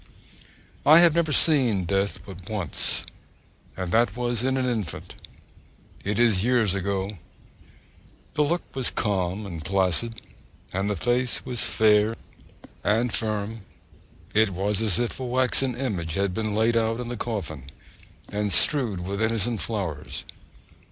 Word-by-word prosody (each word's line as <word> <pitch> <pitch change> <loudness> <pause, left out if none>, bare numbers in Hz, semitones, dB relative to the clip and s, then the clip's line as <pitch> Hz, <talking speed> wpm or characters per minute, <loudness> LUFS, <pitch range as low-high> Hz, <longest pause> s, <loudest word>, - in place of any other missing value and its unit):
I 155 +2 +7
have 170 -2 +6
never 165 -2 +1
seen 130 - +5
death 100 +3 -1
but 90 -3 -11
once, 105 -7 0 0.7
and 95 -2 -4
that 115 -1 +2
was 120 -1 -1
in 130 +1 0
an 130 - 0
infant. 110 -10 -4 0.9
It 100 +1 -2
is 110 -6 +3
years 120 -5 +3
ago. 100 0 -3 1.1
The 150 - 0
look 170 +4 0
was 130 -2 +2
calm 100 -1 -2
and 85 -5 -7
placid, 95 +5 0 0.5
and 95 +2 -1
the 105 - -1
face 120 +3 0
was 125 -3 -2
fair 110 0 +3 0.7
and 115 +3 +1
firm. 110 0 -2 0.7
It 110 0 +4
was 100 +3 -1
as 105 -4 +2
if 120 +1 -2
a - - -4
waxen 130 0 +1
image 95 - -3
had 100 -1 0
been 110 0 -2
laid 115 +2 +2
out 115 0 0
in 125 - -5
the 120 - -4
coffin, 100 - -5 0.7
and 105 0 -1
strewed 105 - +4
with 100 +3 -4
innocent 115 0 0
flowers. 90 -10 -4
110 Hz, 140 wpm, -25 LUFS, 95-120 Hz, 1.1 s, I